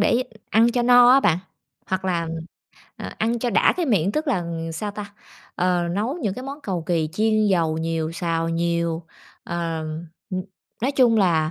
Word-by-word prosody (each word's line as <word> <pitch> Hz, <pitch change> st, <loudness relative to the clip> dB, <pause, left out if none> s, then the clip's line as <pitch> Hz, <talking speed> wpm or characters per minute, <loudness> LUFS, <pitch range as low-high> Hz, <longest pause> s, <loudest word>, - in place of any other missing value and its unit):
để 235 Hz, +4 st, +3 dB, 0.3 s
ăn 230 Hz, +2 st, +5 dB
cho 245 Hz, -1 st, +1 dB
no 245 Hz, 0 st, +7 dB
á 270 Hz, +1 st, +7 dB
bạn, 165 Hz, -8 st, +3 dB, 0.5 s
hoặc 190 Hz, 0 st, -2 dB
là, 170 Hz, -3 st, -1 dB, 0.7 s
à, -, -, -7 dB
ăn 230 Hz, +2 st, 0 dB
cho 245 Hz, +1 st, -1 dB
đã -, -, +4 dB
cái 350 Hz, -3 st, 0 dB
miệng, 200 Hz, -5 st, +2 dB
tức 310 Hz, +1 st, -1 dB
là 195 Hz, -10 st, +1 dB, 0.3 s
sao 205 Hz, +6 st, -4 dB
ta? 205 Hz, 0 st, -8 dB, 0.4 s
Ờ, 175 Hz, -1 st, +1 dB
nấu 215 Hz, +9 st, -1 dB
những 210 Hz, -, -2 dB
cái 255 Hz, -, -7 dB
món 275 Hz, +3 st, -7 dB
cầu 180 Hz, -, -3 dB
kì, 165 Hz, -3 st, +1 dB
chiên 215 Hz, +1 st, +2 dB
dầu 165 Hz, -5 st, +1 dB
nhiều, 165 Hz, 0 st, -2 dB
xào 165 Hz, -1 st, -1 dB
nhiều, 170 Hz, 0 st, -1 dB, 0.4 s
ờ, 170 Hz, -1 st, -3 dB, 0.5 s
ừm, 185 Hz, 0 st, -2 dB, 0.4 s
nói 270 Hz, -, +1 dB
chung 250 Hz, -4 st, +4 dB
là 165 Hz, -6 st, +3 dB
190 Hz, 185 wpm, -23 LUFS, 170-235 Hz, 0.7 s, no